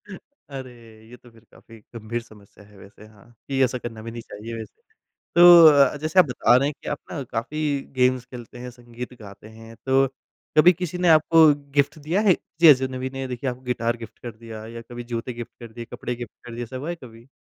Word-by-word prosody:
अरे! 145 - -11 0.4
ये 125 - -13
तो 120 - -19
फिर 115 -1 -21
काफ़ी 115 - -17 0.2
गंभीर 115 +1 -4
समस्या 105 -3 -18
है 105 0 -20
वैसे 100 +2 -15
हाँ, 110 +2 -21
कि 135 -1 +1
ऐसा 125 0 0
करना 115 -2 -8
भी 115 +1 -7
नहीं 115 0 -7
चाहिए 115 +1 -9
वैसे। 115 - -11 0.5
तो 160 -5 +8
जैसे 155 +5 +1
आप 180 - +7
बता 125 -2 +2
रहे 135 +2 +1
हैं 150 - -3
कि - - -5
आप 145 - -3
ना 145 - -4
काफ़ी 145 +4 -2
गेम्स 125 -1 +2
खेलते 125 -1 -11
हैं, 125 0 -7
संगीत 120 +1 -10
गाते 100 0 -12
हैं 115 +1 -13
तो 135 0 +3 0.5
कभी 175 +4 +7
किसी 180 0 -5
ने 180 0 0
आपको 160 +1 +6 0.3
गिफ्ट 140 +3 +2
दिया 165 +7 -1
है? 205 -4 +5
किसी 165 0 +1
अजनबी 130 -2 +2
ने 135 0 -4
देखिए 130 +1 -3
आपको 125 0 -7
गिटार 120 -2 -1
गिफ्ट 115 -2 -12
कर 120 - -7
दिया 110 -1 -10
या 115 0 -8
कभी 120 0 -7
जूते 120 +1 -5
गिफ्ट 120 +1 -10
दिए, 115 +1 -8
कपड़े 120 +1 -6
गिफ्ट 120 -2 -9
कर 120 -1 -9
दिए। 120 - -4
ऐसा 120 +2 -7
हुआ 145 +6 -6
है 175 - -3
कभी? 115 0 -14
125 Hz, 215 wpm, -23 LUFS, 115-145 Hz, 0.5 s, तो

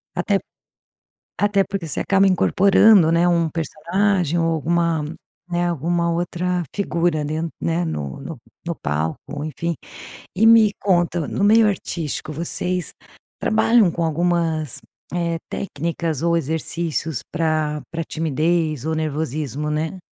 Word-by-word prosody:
Até - - +1 1.0
até 205 -1 +2
porque 195 -4 -4
você 155 - -3
acaba 195 0 +3
incorporando, 195 -1 +5
né, 170 +1 +3
um 170 -2 +2
personagem 170 +2 0
ou 165 - +2
alguma, 165 0 +1 0.5
né, 175 0 0
alguma 170 +1 0
outra 175 +1 -1
figura, 170 -5 0
ali, 150 +1 -3 0.3
né, 165 +1 0
no 75 - -4
no 160 -1 -7 0.3
no 170 0 -2
palco, 80 - -3
enfim. 165 +2 -3 0.6
E 210 +4 +3
me 225 -2 +7
conta, 175 -4 +1
no 200 - -2
meio 220 +1 +6
artístico, 165 -6 -3
vocês 175 +3 -3 0.5
trabalham 220 -2 +4
com 170 - -2
algumas, 165 -3 0 0.3
eh, 170 -1 -1
técnicas 165 -3 -3
ou 170 0 +2
exercícios 160 -2 -2
pra 155 -2 0
pra 165 0 -2
timidez 155 -2 0
ou 160 - 0
nervosismo, 150 -2 -2
né? 155 +4 -2
170 Hz, 125 wpm, -21 LUFS, 155-175 Hz, 1.0 s, me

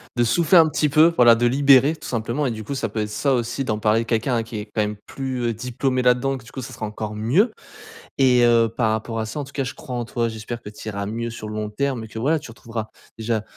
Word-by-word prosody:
de 120 - +2
souffler 165 +9 +4
un 165 -2 +7
petit 150 0 +1
peu, 160 +3 +5
voilà, 120 -4 +7
de 120 - +1
libérer 140 +3 +5
tout - - -10
simplement 120 +5 -2
et 130 - 0
du 110 -1 -6
coup 140 +7 -5
ça, 115 -4 -1
peut 110 +1 -5
être, 105 - -3
ça 115 +7 0
aussi, 125 +2 -1
d'en 110 -3 -1
parler 110 +2 +2
quelqu'un 120 +2 0
à 115 - 0
qui 115 -1 -7
est 105 - -5
quand 110 - +1
même 105 0 -2
plus, 130 -2 -4
heu, 115 - 0
diplômé 125 +3 -1
là-dedans 125 +2 +2
que 115 - -14
du 130 - -14
coup 130 - -6
ça - - -8
sera 110 - -5
encore 105 0 -5
mieux. 135 - +2 0.7
Et 125 -2 +4
heu, 115 -1 +4
par 115 0 0
rapport 110 +1 -3
à 110 - -1
ça 110 +7 -5
en - - -2
tout 140 - -15
cas, 140 - -1
je 130 - -5
crois 130 -5 -7
en 120 -1 -2
toi, 115 0 -1
j'espère 110 +2 -6
que - - -9
tu 105 +1 -11
iras 100 -1 -4
mieux 115 +3 -3
sur 115 -2 -7
le 105 - -6
long 105 0 -3
terme 130 +1 -2
et - - -8
que, 110 - -7
voilà, 150 +7 +2
tu 140 - -11
retrouveras 115 -1 -6 0.3
déjà 110 -1 -1
120 Hz, 290 wpm, -22 LUFS, 110-135 Hz, 0.7 s, un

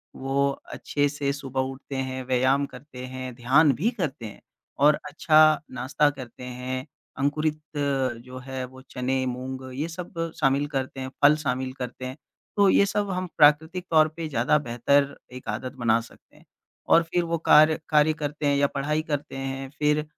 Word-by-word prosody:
वो 135 +1 0 0.2
अच्छे 145 0 0
से 145 -1 -2
सुबह 135 -2 -3
उठते 135 +1 -9
हैं, 130 -1 -3
व्यायाम 130 +2 +2
करते 125 -1 -10
हैं, 130 0 -6
ध्यान 135 +5 +4
भी 220 - +3
करते 135 -8 -3
हैं 105 - -10 0.4
और 150 +2 +5
अच्छा 155 0 +5
नाश्ता 130 +4 +1
करते 130 -4 -9
हैं, 125 +1 -5 0.3
अंकुरित 155 +2 0 0.2
जो 130 -3 -2
है 130 -1 -4
वो 130 +1 -13
चने, 130 +1 -1
मूँग 130 +1 -5
ये 150 +5 -2
सब 165 -1 -5
शामिल 140 +2 +2
करते 130 0 -4
हैं 130 - -4
फल 150 +1 +8
शामिल 130 -1 -2
करते 125 0 -5
हैं, 130 +1 -5 0.4
तो 200 -1 +6
ये 200 - +5
सब 205 0 -1
हम 185 0 -2
प्राकृतिक 160 +5 +4
तौर 155 -1 +6
पे 165 -1 -4
ज़्यादा 130 +1 +2
बेहतर 140 +4 +2 0.2
1 125 - -10
आदत 125 +5 -4
बना 115 -1 +3
सकते 115 - -18
हैं। - - -21 0.4
और 170 - +6
फिर 175 +1 0
वो 170 0 -1
कार्य 155 0 +6
कार्य 150 0 +4
करते 150 0 -3
हैं 145 0 +3
या 140 0 +3
पढ़ाई 150 +3 0
करते 145 -2 -3
हैं 135 0 -4
फिर 150 0 +2
140 Hz, 175 wpm, -25 LUFS, 130-150 Hz, 0.4 s, फल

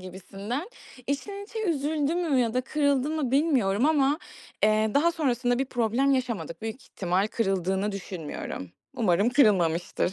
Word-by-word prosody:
gibisinden. 195 - -6 0.4
İçten 395 +9 -3
içe 440 +1 -5
üzüldü 305 -1 0
mü 320 -7 +1
ya 230 -1 0
da 255 - +2
kırıldı 285 0 +1
mı 305 -6 -1
bilmiyorum 265 -6 +2
ama, 290 -1 +3 0.4
eee, 215 +1 +3
daha 335 +4 +4
sonrasında 245 -6 0
bir 270 - +1
problem 245 +2 +1
yaşamadık. 220 - -3
Büyük 225 +3 -5
ihtimal 185 +2 -1
kırıldığını 195 -1 0
düşünmüyorum. 165 - -6 0.3
Umarım 200 0 +3
kırılmamıştır. 180 - +2
245 Hz, 135 wpm, -27 LUFS, 195-285 Hz, 0.4 s, daha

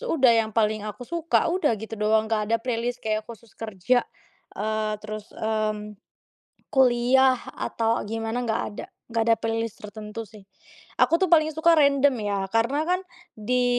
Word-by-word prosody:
udah. 260 -5 +5
Yang 220 - -5
paling 215 -1 +2
aku 210 +4 -8
suka, 335 -1 +2
udah 320 -8 +2
gitu 225 - -7
doang. 220 +1 +3
Enggak 220 -1 0
ada 230 0 +2
playlist 240 0 -2
kayak 215 0 0
khusus 230 -1 -12
kerja, 220 +3 +1 0.6
eee, 215 0 -1
terus, 215 -1 -6 0.2
mmm, 215 -1 0 1.0
kuliah 255 0 +4 0.3
atau 225 -1 0 0.2
gimana. 225 +1 -2
Enggak 225 -2 -1
ada, - - -7 0.2
enggak 230 -1 +1
ada 230 - +6
playlist 225 -1 -2
tertentu 210 +1 -7
sih. 210 -2 -13 0.6
Aku - - 0
tuh 375 - +2
paling 310 -1 +5
suka 335 +1 +5
random 280 -1 +4 0.2
ya, 200 - 0 0.2
karena 235 +6 +2
kan 365 - +2 0.5
di, 250 0 +3
225 Hz, 155 wpm, -25 LUFS, 215-255 Hz, 1.0 s, ada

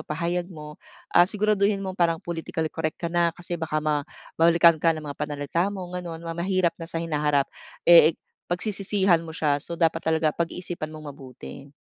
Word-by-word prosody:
pahayag 170 +3 -2
mo, 150 -3 -10 0.3
ah, 175 +1 +6
siguraduhin 205 -1 +1
mo 190 - -3
parang 170 -3 +1
politically 165 -2 -3
correct 155 -1 -3
ka 170 0 -4
na 170 -1 +3
kasi 175 -1 -4
baka 155 -1 -2
ma 150 -1 +1 0.4
balikan 170 -1 +6
ka 165 0 +3
ng 155 - -7
mga 145 -1 -7
pananalita 150 +4 -1
mo, 195 -3 -5
gano'n. 170 -2 -6
Ma 165 - -4
mahirap 175 0 0
na 165 - -5
sa 170 - -3
hinaharap. 150 -3 +1 0.4
Eh, 165 -2 +7 0.3
pagsisisihan 190 -1 +1
mo 160 -1 -9
siya, 145 -2 +1
so, 170 +3 -6
dapat 165 -1 +2
talaga 160 -1 +1
pag-iisipan 170 -1 -3
mong 155 -2 -9
mabuti. 135 +1 -11
165 Hz, 175 wpm, -25 LUFS, 155-175 Hz, 0.4 s, Eh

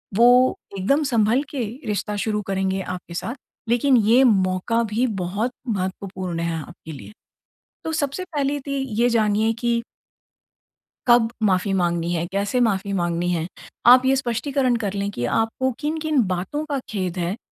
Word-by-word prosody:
वो 245 +3 +5 0.2
एकदम 275 +11 +2
संभल 230 +5 +3
के 280 - -5 0.3
रिश्ता 210 0 -2
शुरू 210 -1 0
करेंगे 190 0 -1
आपके 180 -2 -7
साथ। 230 +9 -4 0.3
लेकिन 250 +2 +4
ये 230 +5 +5
मौका 195 +1 +2
भी 225 +3 0 0.2
बहुत 200 +8 -2 0.2
महत्वपूर्ण 185 -3 -3
है 165 -1 -2
आपके 160 -1 -11
लिए। 145 - -10 0.7
तो 320 - -2
सबसे 300 +4 -2
पहली 290 -4 -1
ती 280 +1 -4 0.2
ये 245 - +4
जानिए 220 -1 +2
कि 235 -1 0 1.3
कब 240 -1 +5
माफ़ी 195 -1 +2
माँगनी 175 -2 0
है, 170 0 -1
कैसे 205 +6 0
माफ़ी 200 -3 +1
माँगनी 175 -1 0
है। 165 -1 -1 0.4
आप 250 +1 +8
ये 270 +1 +4
स्पष्टीकरण 255 +1 0
कर 205 -4 -2
लें 200 0 -2
कि 120 -11 -4
आपको 225 +4 0
किन-किन 310 -3 0
बातों 185 +12 -2
का 280 - 0
खेद 185 -3 -3
है 175 +4 -1
215 Hz, 155 wpm, -22 LUFS, 185-250 Hz, 1.3 s, आप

